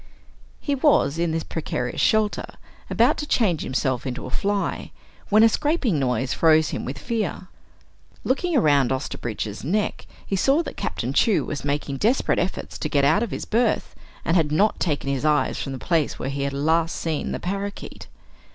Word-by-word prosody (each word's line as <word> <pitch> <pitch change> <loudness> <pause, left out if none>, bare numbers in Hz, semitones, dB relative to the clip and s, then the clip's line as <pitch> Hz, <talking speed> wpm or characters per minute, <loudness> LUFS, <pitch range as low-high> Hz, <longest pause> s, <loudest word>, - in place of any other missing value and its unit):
He 285 - -2
was, 265 - +3
in 170 0 +1
this 160 0 -1
precarious 125 -6 -3
shelter, 215 -1 +1 0.3
about - - +3
to 295 - -4
change 190 - +2
himself 130 -1 -1
into 130 0 -5
a 130 - -7
fly, 200 +5 -1 0.4
when 215 +2 +6
a - - +8
scraping 275 - +1
noise 125 -1 0
froze 160 -1 +4
him - - -4
with 135 +3 -5
fear. 195 +1 -3 0.7
Looking 320 +4 +1
around 145 - +3
Osterbridge's 115 -5 -4
neck 200 +9 -1 0.2
he 195 - -2
saw 275 - +3
that - - -7
Captain - - -3
Chew 220 -5 +3
was 150 - -5
making 140 -1 -2
desperate 235 - +2
efforts 180 +2 -3
to 150 - -2
get 140 -2 +2
out 155 +9 +4
of 235 - -1
his - - -5
berth, 230 +1 0 0.3
and 165 - +2
had 160 -4 +2
not 200 +8 +2
taken 150 -5 -1
his 135 -1 -2
eyes 150 -1 +2
from 135 - -4
the 135 - -4
place 160 +1 0
where - - -4
he 140 0 -3
had 140 0 -1
last 160 +4 +1
seen 160 -2 -2
the - - -3
parakeet. 200 +2 -5
165 Hz, 180 wpm, -23 LUFS, 140-210 Hz, 0.7 s, a